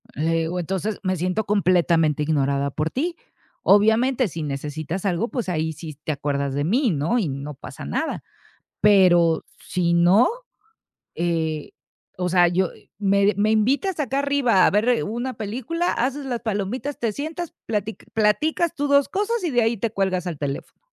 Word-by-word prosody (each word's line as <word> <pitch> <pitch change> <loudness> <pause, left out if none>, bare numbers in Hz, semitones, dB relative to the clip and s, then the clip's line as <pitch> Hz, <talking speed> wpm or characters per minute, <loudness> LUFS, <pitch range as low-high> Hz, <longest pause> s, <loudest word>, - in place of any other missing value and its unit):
Le 160 +4 0
digo, 165 +2 -1
entonces, 195 +4 -3
me 185 -1 0
siento 185 +5 -1
completamente 170 -6 +2
ignorada 140 -2 +1
por 155 +3 -2
ti. 335 +6 -2 0.5
Obviamente, 225 +5 +4
si 160 -3 -5
necesitas 150 +6 -4
algo, 195 +5 0
pues, 240 -8 -3
ahí 160 -1 -1
si 155 0 -9
te 155 +2 -4
acuerdas 140 -1 -2
de 145 +1 -1
mí, 235 - +2
¿no? 160 +9 0
Y 200 -10 0
no 140 +2 -6
pasa 130 - -9
nada. 70 - -2 0.6
Pero 175 -5 +5 0.2
si 170 -1 -1
no, 180 +7 +5 0.8
eh, 160 -3 -2 0.5
o 180 0 -1
sea, 175 0 +5
yo 175 +1 +1 0.3
me 200 0 +3
me 215 +1 +2
invitas 275 - +1
acá 270 -1 0
arriba 280 -9 +3
a - - +4
ver 230 +4 +2
una 240 +5 -3
película, 250 - -2
haces 270 +4 -1
las 245 -3 -3
palomitas, 220 +7 -3
te 230 -2 -1
sientas 315 +7 -5
platic 210 0 -3
platicas 305 +10 +1
tú 290 -3 -2
dos 280 0 +4
cosas 420 +2 -1
y 335 - 0
de 245 -2 +3
ahí 225 +1 +1
te 220 +2 -2
cuelgas 190 -3 -1
al 165 -4 -4
teléfono. 140 - -5
195 Hz, 165 wpm, -23 LUFS, 165-245 Hz, 0.8 s, Pero